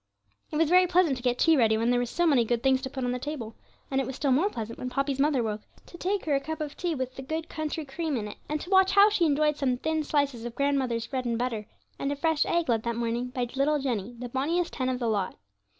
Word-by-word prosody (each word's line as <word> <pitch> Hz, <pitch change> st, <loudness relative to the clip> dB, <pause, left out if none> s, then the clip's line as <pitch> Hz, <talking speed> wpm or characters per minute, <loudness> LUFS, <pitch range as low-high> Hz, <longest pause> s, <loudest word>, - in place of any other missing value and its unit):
It -, -, -6 dB
was 320 Hz, +1 st, +3 dB
very 365 Hz, +2 st, +5 dB
pleasant 355 Hz, -5 st, +3 dB
to -, -, -8 dB
get 245 Hz, 0 st, +1 dB
tea 325 Hz, +4 st, +5 dB
ready, 225 Hz, -5 st, +3 dB
when 230 Hz, +2 st, +1 dB
there 245 Hz, -, +3 dB
were 245 Hz, -, -1 dB
so 345 Hz, +8 st, 0 dB
many 280 Hz, -7 st, +4 dB
good 235 Hz, +1 st, -1 dB
things 265 Hz, -1 st, +3 dB
to 265 Hz, -, -4 dB
put 265 Hz, -1 st, -5 dB
on 245 Hz, -, 0 dB
the 250 Hz, -, -2 dB
table, 255 Hz, -5 st, -5 dB, 0.4 s
and 270 Hz, 0 st, +2 dB
it 260 Hz, -, -4 dB
was 265 Hz, -, -5 dB
still 280 Hz, -1 st, 0 dB
more 315 Hz, +11 st, +3 dB
pleasant 230 Hz, -, -6 dB
when 255 Hz, -, -3 dB
Poppy's 275 Hz, +1 st, -1 dB
mother 280 Hz, -3 st, +2 dB
woke, 215 Hz, -1 st, -3 dB, 0.2 s
to -, -, -14 dB
take 380 Hz, +3 st, -2 dB
her 300 Hz, -, +1 dB
a 275 Hz, -, +3 dB
cup 315 Hz, +3 st, -5 dB
of 300 Hz, -2 st, -4 dB
tea 345 Hz, -2 st, -2 dB
with 260 Hz, -1 st, -3 dB
the -, -, -6 dB
good 315 Hz, +4 st, -4 dB
country 310 Hz, -1 st, -4 dB
cream 300 Hz, 0 st, -2 dB
in 210 Hz, -2 st, -3 dB
it, -, -, -10 dB
and 305 Hz, 0 st, -1 dB
to 360 Hz, -, -8 dB
watch 380 Hz, 0 st, +5 dB
how 405 Hz, +2 st, +7 dB
she 370 Hz, -5 st, +2 dB
enjoyed 300 Hz, 0 st, +2 dB
some 255 Hz, -4 st, 0 dB
thin 315 Hz, +3 st, -1 dB
slices 280 Hz, -5 st, 0 dB
of 235 Hz, -1 st, -6 dB
grandmother's 260 Hz, -4 st, 0 dB
bread 255 Hz, +1 st, -3 dB
and 235 Hz, -1 st, 0 dB
butter, 230 Hz, -3 st, -2 dB, 0.3 s
and 275 Hz, -, -1 dB
a -, -, -1 dB
fresh 315 Hz, +1 st, +1 dB
egg 340 Hz, -1 st, +1 dB
laid 230 Hz, -2 st, +2 dB
that 235 Hz, 0 st, -2 dB
morning 235 Hz, +1 st, -1 dB
by 250 Hz, -1 st, -3 dB
'little 290 Hz, +3 st, +2 dB
Jenny, 240 Hz, -5 st, -3 dB
the 245 Hz, +1 st, -5 dB
bonniest 320 Hz, +8 st, -1 dB
hen 255 Hz, -2 st, -1 dB
of 255 Hz, -, -1 dB
the 240 Hz, -2 st, -2 dB
lot.' 205 Hz, -4 st, -1 dB
270 Hz, 280 wpm, -27 LUFS, 245-310 Hz, 0.4 s, how